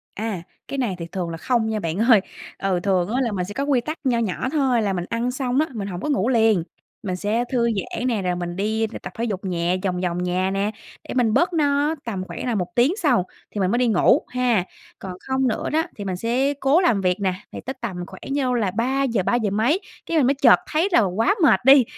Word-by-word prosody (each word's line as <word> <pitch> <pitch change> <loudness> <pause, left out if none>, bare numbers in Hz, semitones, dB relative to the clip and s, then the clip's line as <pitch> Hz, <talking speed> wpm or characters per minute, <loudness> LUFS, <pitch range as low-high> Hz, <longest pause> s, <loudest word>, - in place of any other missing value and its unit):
À, 210 -4 -3 0.3
cái 275 - -4
này 240 -8 -1
thì 170 - -4
thường 180 -3 -3
là 165 - -5
không 235 +4 0
nha 220 -1 -1
bạn 165 -3 -3
ơi. 225 -1 +5 0.4
Ừ, 190 -2 0
thường 185 -3 +2
á 250 +4 0
là 240 -3 0
mình 185 -3 -2
sẽ 205 - -7
có 275 - -2
quy 280 -4 +2
tắc 310 +6 -5
nho 255 -4 +2
nhỏ 225 +2 -2
thôi, 265 -6 +2
là 200 -2 0
mình 175 -2 -3
ăn 235 +2 -1
xong 255 0 -1
á, 310 - +2
mình 205 -4 -4
hổng 180 -2 -5
có 300 - -3
ngủ 250 -5 +1
liền, 225 -7 +3 0.4
mình 185 -3 -2
sẽ 210 +5 0
thư 240 -2 +2
giãn 220 +4 -3
nè, 230 -5 0
rồi 180 -1 -1
mình 175 0 -4
đi 220 +3 0 0.2
tập - - -7
thể 230 - -2
dục 200 -5 -3
nhẹ 175 0 0
vòng 180 -2 -1
vòng 180 -1 -1
nhà 185 +1 0
nè, 200 +2 0 0.4
để - - -3
mình 240 -4 +2
bớt 345 +8 +2
no, 295 0 +2
tầm 200 -5 -3
khoảng - - -6
là 245 -2 0
1 180 -3 -3
tiếng 255 +8 +4
sau, 250 - +3 0.3
thì 210 - -4
mình 190 -1 +1
mới 235 - +2
đi 250 0 +2
ngủ 210 -6 +4
ha. 245 -6 +1 0.4
Còn 190 -1 -6
không 265 0 +1
nữa 225 - -1
đó 315 +2 +2
thì 205 - -6
mình 190 -2 -2
sẽ 245 +8 0
cố 285 +4 +3
làm 235 - +2
việc 180 -1 +1
nè, 190 -2 +1 0.2
thì - - -7
tới 265 - -3
tầm 185 -6 -4
khoảng 190 - -12
nhau, 265 -3 +1
là 220 -6 0
3:00, 240 0 0
ba 240 - +1
giờ 220 -4 +1
mấy 225 - +2 0.3
cái 330 - -1
mình 270 -5 +4
mới 275 - +4
chợt 270 -4 +6
thấy 320 +5 +2
là 235 - +5
quá 210 - +1
mệt 190 -11 +6
đi, 270 0 +8
225 Hz, 255 wpm, -22 LUFS, 190-260 Hz, 0.4 s, đi